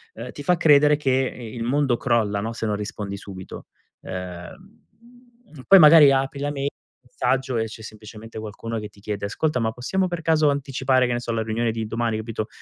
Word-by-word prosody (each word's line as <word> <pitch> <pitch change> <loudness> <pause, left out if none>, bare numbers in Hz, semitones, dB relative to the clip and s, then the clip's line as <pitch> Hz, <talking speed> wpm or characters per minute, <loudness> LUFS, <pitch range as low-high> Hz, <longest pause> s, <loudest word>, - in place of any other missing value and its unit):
ehm, - - -7
ti - - -9
fa 180 -1 +2
credere 150 -2 +5
che 145 -2 -1
il 125 -3 -2
mondo 135 +1 +1
crolla, 115 -5 0
no, 110 +2 -3
se 115 0 -5
non 105 -1 0
rispondi 105 -1 -5
subito. 95 -1 -10 0.3
Ehm, 90 - -9 0.8
poi, 195 - +8
magari, 150 -3 +8
apri 135 +1 0
la 145 0 -1
mai 140 -1 -2 0.3
messaggio, 130 +1 -1
e 110 - 0
c'è 110 0 -10
semplicemente 110 +1 -10
qualcuno 110 +1 -6
che 105 -1 -7
ti 100 - -21
chiede: 100 -1 -4
"Ascolta, 130 +6 -1
ma 110 0 0
possiamo, 185 +11 -1
per 175 -1 -4
caso, 155 -2 +3
anticipare, 135 -2 +1
che 125 - -1
ne 120 - -1
so, 120 - -4
la 110 -1 -1
riunione 115 +1 -1
di 110 0 -4
domani?" 115 0 -1
Capito, 110 0 -4
120 Hz, 195 wpm, -23 LUFS, 110-140 Hz, 0.8 s, poi